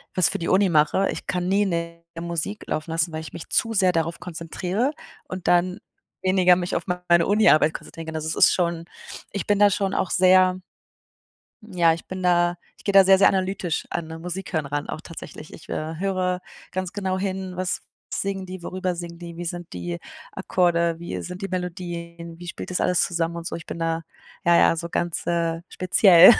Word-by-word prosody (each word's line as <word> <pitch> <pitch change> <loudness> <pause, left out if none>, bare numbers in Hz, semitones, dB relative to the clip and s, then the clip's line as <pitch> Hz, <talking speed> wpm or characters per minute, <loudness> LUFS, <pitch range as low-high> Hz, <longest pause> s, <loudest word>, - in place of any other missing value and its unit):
was 185 - +4
für - - -3
die 170 - -3
Uni 190 0 +4
mache, 160 +4 +3
ich - - -7
kann 180 0 -1
nie 200 +2 +3
'ne 170 -2 -3 0.2
Musik 170 +5 -3
laufen 155 +1 -3
lassen, 165 0 0
weil 155 0 -4
ich 155 - -10
mich - - -8
zu 225 0 +1
sehr 190 -3 +4
darauf 165 0 -1
konzentriere 180 - -2 0.3
und 185 -1 -6
dann 180 +1 +3 0.4
weniger 185 -1 +5
mich 175 0 -2
auf - - -1 0.3
meine 170 -1 +5
Uniarbeit 160 -7 +5
konzentrieren 165 - -8
kann. 160 - -5
Also, 155 0 -3
es 160 - -1
ist - - +6
schon 170 -2 -1 0.5
ich 200 - -3
bin 205 -1 +2
da 205 - +7
schon 195 0 0
auch 185 - 0
sehr 185 0 +5 1.1
ja, 170 -3 +4
ich 165 - -10
bin 185 0 -6
da 175 -1 +3 0.2
ich - - -19
gehe 200 - +1
da 195 -1 +8
sehr, 190 0 +6
sehr 195 - +7
analytisch 185 -3 -1
an 170 -2 -3
Musikhören, 165 -5 -3
auch - - -4
tatsächlich. - - -10
Ich, - - -13
äh, 155 +1 -3
höre 185 -2 0 0.3
ganz 185 -1 -3
genau 190 -2 -2
hin, 190 -1 -3
was 185 0 -2 0.3
singen 195 -1 -2
die, 185 -1 -8
worüber 185 0 -2
singen 170 -1 -7
die, 170 -1 -9
wie 175 - -5
sind 175 0 -6
die 85 -1 -4 0.3
Akkorde, 170 -2 +1
wie 170 - -5
sind 180 +1 -7
die 195 - -3
Melodien, 170 -2 -5
wie 175 - -8
spielt - - -6
das 180 - -1
alles 180 - +2
zusammen 170 -1 -1
und 170 0 -6
so. - - -3
Ich 165 - -7
bin - - -6
da, 165 0 -1 0.4
ja, 170 0 +5
ja, 165 - +5
so 170 +1 -4
ganz, 170 0 -2
äh, 170 -1 0
speziell. 185 +1 +7
175 Hz, 200 wpm, -24 LUFS, 170-185 Hz, 1.1 s, da